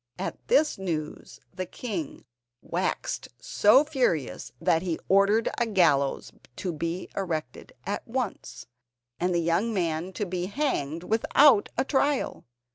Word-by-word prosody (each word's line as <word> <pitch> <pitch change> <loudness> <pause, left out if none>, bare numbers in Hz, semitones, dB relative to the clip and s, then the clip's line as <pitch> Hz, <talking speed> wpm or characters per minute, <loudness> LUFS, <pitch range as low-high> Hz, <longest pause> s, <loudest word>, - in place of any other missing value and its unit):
At - - -4
this 315 - +3
news 160 -5 -5
the 185 0 -4
king 185 - -5 0.4
waxed - - -2
so 210 - +5
furious 250 - -1
that 165 - +2
he 175 -3 -2
ordered 200 +3 +4
a 235 - +1
gallows 165 -10 +2 0.2
to 185 -3 -3
be 170 +3 -3
erected 160 -9 -4
at - - -4
once, - - -4 0.5
and 180 +1 +1
the 175 - +1
young 175 +7 +1
man 170 0 -1
to 210 - -2
be 180 -1 -3
hanged 175 - -2
without 225 +3 +4
a 260 - +1
trial. 280 0 0
185 Hz, 130 wpm, -27 LUFS, 165-225 Hz, 0.5 s, so